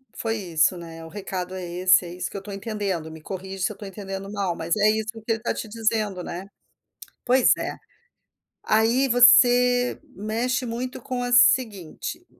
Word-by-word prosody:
foi 225 Hz, 0 st, -2 dB
isso, 175 Hz, -3 st, +1 dB
né, 165 Hz, -1 st, -9 dB
o 165 Hz, -, -10 dB
recado 190 Hz, -1 st, -5 dB
é 185 Hz, -1 st, -5 dB
esse, 185 Hz, +1 st, +3 dB
é -, -, -7 dB
isso 180 Hz, -, -5 dB
que -, -, -6 dB
eu -, -, -3 dB
estou 200 Hz, +1 st, -9 dB
entendendo, 195 Hz, -6 st, -4 dB
me 160 Hz, -, -10 dB
corrige 190 Hz, +1 st, -6 dB
se -, -, +1 dB
eu -, -, -6 dB
estou 205 Hz, -, -11 dB
entendendo 195 Hz, 0 st, -7 dB
mal, 195 Hz, -4 st, -2 dB
mas 165 Hz, +1 st, -1 dB
é 210 Hz, +1 st, +4 dB
isso 220 Hz, 0 st, -1 dB
que 225 Hz, -2 st, -12 dB
ele 225 Hz, -, -4 dB
está 230 Hz, -, -2 dB
te -, -, -6 dB
dizendo, 215 Hz, -4 st, -1 dB
né. 180 Hz, +3 st, -6 dB, 0.8 s
Pois 255 Hz, +1 st, +4 dB
é, -, -, -4 dB, 0.9 s
aí 230 Hz, +5 st, +2 dB
você 245 Hz, 0 st, +5 dB, 0.2 s
mexe 230 Hz, +5 st, -2 dB
muito 245 Hz, +2 st, -5 dB
com 250 Hz, +1 st, -4 dB
a 245 Hz, 0 st, -2 dB
seguinte. 220 Hz, -8 st, +2 dB
210 Hz, 185 wpm, -24 LUFS, 185-235 Hz, 0.9 s, você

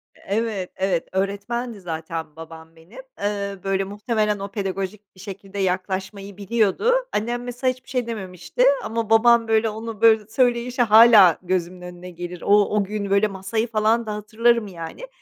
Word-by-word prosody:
Evet, 205 Hz, -3 st, -3 dB
evet, 190 Hz, -3 st, -1 dB
öğretmendi 200 Hz, +4 st, -3 dB
zaten 160 Hz, -2 st, -6 dB
babam 160 Hz, 0 st, -12 dB
benim. 170 Hz, +10 st, -15 dB, 0.2 s
Eee, 200 Hz, -1 st, -3 dB
böyle, 195 Hz, 0 st, 0 dB
muhtemelen 210 Hz, +1 st, -1 dB
o 200 Hz, 0 st, -6 dB
pedagojik 195 Hz, 0 st, -5 dB
bir -, -, -19 dB
şekilde 195 Hz, 0 st, -8 dB
yaklaşmayı 190 Hz, +1 st, -3 dB
biliyordu. 220 Hz, -, +1 dB, 0.2 s
Annem, 240 Hz, +3 st, -2 dB
mesela, 250 Hz, +1 st, -1 dB
hiçbir 255 Hz, +1 st, -21 dB
şey 250 Hz, -2 st, -2 dB
dememişti 190 Hz, 0 st, -3 dB, 0.2 s
ama 220 Hz, 0 st, -3 dB
babam, 230 Hz, +1 st, +5 dB
böyle, 225 Hz, 0 st, +2 dB
onu, 220 Hz, 0 st, -7 dB
böyle, 220 Hz, -2 st, +5 dB
söyleyişi 245 Hz, +1 st, 0 dB
hâlâ 215 Hz, -6 st, +7 dB
gözümün 180 Hz, 0 st, -2 dB
önüne 180 Hz, 0 st, -10 dB
gelir. 175 Hz, 0 st, -8 dB
O 205 Hz, 0 st, +4 dB
o 210 Hz, -, +2 dB
gün, 200 Hz, 0 st, -4 dB
böyle, 200 Hz, +2 st, +3 dB
masayı 195 Hz, +4 st, -3 dB
falan 225 Hz, +1 st, +1 dB
da 215 Hz, -, -4 dB
hatırlarım, 225 Hz, +1 st, +1 dB
yani. 175 Hz, -, -8 dB
205 Hz, 155 wpm, -22 LUFS, 190-225 Hz, 0.2 s, hâlâ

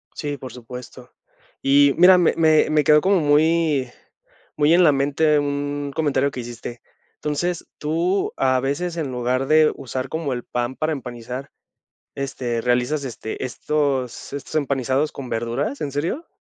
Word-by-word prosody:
Sí, 145 Hz, -1 st, -4 dB
por 130 Hz, -2 st, -9 dB
supuesto. 125 Hz, +1 st, -10 dB, 0.5 s
Y 140 Hz, 0 st, +5 dB
mira, 180 Hz, +1 st, +7 dB
me 175 Hz, -, +3 dB
me 155 Hz, -2 st, +4 dB
me 155 Hz, -1 st, +3 dB
quedó 150 Hz, +1 st, +6 dB
como 190 Hz, +2 st, +3 dB
muy 150 Hz, -2 st, +2 dB, 0.7 s
muy 150 Hz, +2 st, +4 dB
en 180 Hz, +1 st, +5 dB
la 150 Hz, -, +6 dB
mente 145 Hz, +2 st, +2 dB
un 145 Hz, 0 st, -2 dB
comentario 140 Hz, -3 st, +1 dB
que 130 Hz, -, -6 dB
hiciste. 120 Hz, 0 st, -8 dB, 0.3 s
Entonces, 165 Hz, +4 st, -2 dB
tú, 170 Hz, +6 st, 0 dB
a 130 Hz, -1 st, +2 dB
veces, 155 Hz, +6 st, -2 dB
en 155 Hz, -5 st, -3 dB
lugar 125 Hz, +2 st, -1 dB
de 155 Hz, +1 st, +5 dB
usar 130 Hz, 0 st, -5 dB
como 160 Hz, -1 st, -3 dB
el 120 Hz, -1 st, -3 dB
pan 120 Hz, +1 st, -3 dB
para 155 Hz, 0 st, -1 dB
empanizar, 125 Hz, -1 st, -6 dB, 0.7 s
este, 130 Hz, -4 st, -3 dB
realizas, 125 Hz, +5 st, 0 dB
este, 120 Hz, -1 st, -5 dB
estos 135 Hz, -1 st, -2 dB
estos 140 Hz, -1 st, -7 dB
empanizados 140 Hz, 0 st, 0 dB
con 135 Hz, -2 st, -7 dB
verduras, 120 Hz, +6 st, -2 dB
¿en 145 Hz, -3 st, -3 dB
serio? 170 Hz, -, -2 dB
140 Hz, 155 wpm, -22 LUFS, 130-155 Hz, 0.7 s, mira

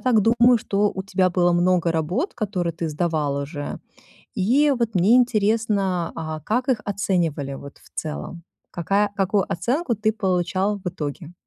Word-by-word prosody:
так 245 Hz, -4 st, +3 dB
думаю, 240 Hz, +2 st, +5 dB
что 205 Hz, -1 st, 0 dB
у 190 Hz, -, -3 dB
тебя 190 Hz, -1 st, +1 dB
было 175 Hz, 0 st, +2 dB
много 175 Hz, -1 st, +2 dB
работ, 175 Hz, -, -1 dB
которые 185 Hz, -6 st, -2 dB
ты 165 Hz, 0 st, -4 dB
сдавал 155 Hz, -3 st, -1 dB
уже, 145 Hz, +1 st, -5 dB, 0.6 s
и 265 Hz, +9 st, +3 dB
вот 230 Hz, -3 st, -1 dB
мне 195 Hz, +7 st, +5 dB
интересно, 210 Hz, -6 st, +1 dB
а 155 Hz, -1 st, -4 dB
как 245 Hz, -, -1 dB
их 235 Hz, -5 st, +1 dB
оценивали, 175 Hz, -8 st, -1 dB
вот, 140 Hz, +1 st, -10 dB
в -, -, -21 dB
целом. 165 Hz, +2 st, -5 dB, 0.3 s
Какая 195 Hz, +4 st, +1 dB
какую 195 Hz, 0 st, +1 dB
оценку 235 Hz, -, 0 dB
ты 215 Hz, +1 st, +1 dB
получал 190 Hz, 0 st, 0 dB
в 185 Hz, -, -7 dB
итоге? 155 Hz, +1 st, -5 dB
190 Hz, 155 wpm, -23 LUFS, 170-215 Hz, 0.6 s, думаю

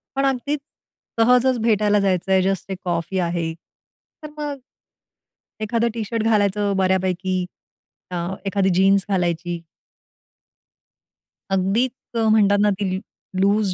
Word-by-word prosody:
पण 275 Hz, 0 st, +1 dB
अगदी 270 Hz, +2 st, 0 dB, 0.6 s
सहजच 250 Hz, +2 st, +4 dB
भेटायला 210 Hz, -2 st, +3 dB
जायचंय 190 Hz, -1 st, +2 dB
जस्ट 195 Hz, 0 st, -1 dB
एक 190 Hz, -, -3 dB
कॉफी 175 Hz, +2 st, -1 dB
आहे. 170 Hz, -2 st, -1 dB, 0.7 s
तर 305 Hz, -, -6 dB
मग 290 Hz, -2 st, -4 dB, 1.0 s
एखादं 230 Hz, +2 st, +1 dB
टी-शर्ट 225 Hz, 0 st, -2 dB
घालायचं 205 Hz, -2 st, +2 dB
बऱ्यापैकी 185 Hz, -1 st, 0 dB, 0.7 s
अ, 180 Hz, -, -4 dB, 0.3 s
एखादी 195 Hz, -1 st, +1 dB
जीन्स 195 Hz, +1 st, +4 dB
घालायची 175 Hz, -2 st, -1 dB, 1.9 s
अगदीच 195 Hz, +7 st, +1 dB, 0.3 s
अ, 225 Hz, -, +2 dB
म्हणतात 205 Hz, -2 st, +4 dB
ना, 210 Hz, -, +4 dB
ती 190 Hz, -2 st, -1 dB, 0.4 s
लूज 200 Hz, -1 st, +2 dB
195 Hz, 110 wpm, -22 LUFS, 185-225 Hz, 1.9 s, सहजच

